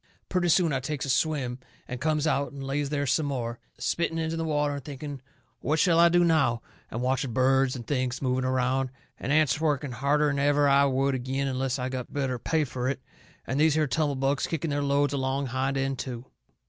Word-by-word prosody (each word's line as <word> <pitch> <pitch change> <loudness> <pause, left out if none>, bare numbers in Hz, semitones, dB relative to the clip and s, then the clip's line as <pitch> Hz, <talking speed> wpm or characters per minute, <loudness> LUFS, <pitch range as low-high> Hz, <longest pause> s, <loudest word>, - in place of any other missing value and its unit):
Purty 180 -2 +1
soon 165 -2 +3
I 135 - +1
takes 140 +1 -3
a 135 - 0
swim, 130 -3 0 0.3
and 125 -1 -6
comes 155 0 +1
out 140 -2 0
and 140 -1 -8
lays 140 +1 -1
there 145 -1 -1
some 145 +3 +1
more, 120 -4 -3 0.2
spitting 170 -1 -1
into 160 0 -1
the 165 - -2
water 150 -2 0
and 140 -1 -6
thinking 145 -1 -7 0.4
what 155 - 0
shall 170 -1 +4
I 170 0 +7
do 175 +1 +4
now, 145 -9 +2 0.3
and 115 +2 -4
watching 130 -1 0
birds 130 +1 +3
and 120 -2 -7
things 130 -3 -1
moving 130 -1 0
around, 130 +1 +1 0.3
and 140 - -3
ants 155 0 +3
working 145 -3 0
harder'n 140 +3 +1
ever 145 0 +3
I 140 0 +5
would 135 0 +1
agin 130 +2 -2
unless 130 0 -1
I 125 0 -2
got 130 -1 -5
better 135 -3 -2
pay 160 +5 +1
fur 130 -2 -3
it, 135 0 -1 0.5
and 135 - -2
these 155 0 +4
here 155 -1 +3
tumble 145 +2 0
bugs 135 +1 0
kicking 165 -1 -2
their 145 0 0
loads 140 0 +1
along 135 0 -1
hind 130 +2 -1
end 135 -1 -1
to. 125 -2 -5
140 Hz, 210 wpm, -27 LUFS, 130-150 Hz, 0.5 s, I